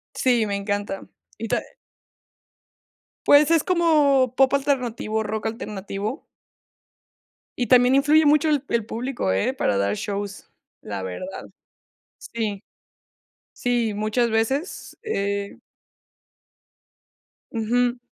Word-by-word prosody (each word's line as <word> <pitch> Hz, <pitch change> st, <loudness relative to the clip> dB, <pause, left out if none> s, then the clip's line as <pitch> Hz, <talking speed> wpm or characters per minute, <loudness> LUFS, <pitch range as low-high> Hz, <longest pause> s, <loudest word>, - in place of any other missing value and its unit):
Sí, 240 Hz, -4 st, +2 dB
me 200 Hz, -, -2 dB
encanta. 205 Hz, -1 st, -3 dB, 0.3 s
Y 225 Hz, 0 st, -4 dB
ta -, -, +1 dB, 1.7 s
Pues, 290 Hz, +1 st, +6 dB
es 330 Hz, -2 st, +4 dB
como 295 Hz, -8 st, +3 dB
pop 270 Hz, 0 st, +4 dB
alternativo, 245 Hz, -6 st, 0 dB
rock 215 Hz, +1 st, -3 dB
alternativo. 210 Hz, +2 st, -5 dB, 1.4 s
Y 245 Hz, -, -1 dB
también 250 Hz, 0 st, +5 dB
influye 295 Hz, +3 st, +4 dB
mucho 300 Hz, +1 st, +4 dB
el 290 Hz, -2 st, +1 dB
el 230 Hz, -2 st, 0 dB
público, 240 Hz, -, -2 dB
¿eh? 175 Hz, -, 0 dB
Para 105 Hz, -, 0 dB
dar 100 Hz, +1 st, +1 dB
shows, 200 Hz, -, -5 dB, 0.3 s
la 100 Hz, -2 st, -5 dB
verdad. 185 Hz, -, -6 dB, 0.7 s
Sí. 215 Hz, -4 st, -4 dB, 0.9 s
Sí, 240 Hz, -3 st, 0 dB
muchas 215 Hz, +3 st, 0 dB
veces, 265 Hz, -, -2 dB
eh 200 Hz, -, -2 dB, 1.9 s
Ujú. 245 Hz, +2 st, 0 dB
230 Hz, 105 wpm, -23 LUFS, 205-270 Hz, 1.9 s, Pues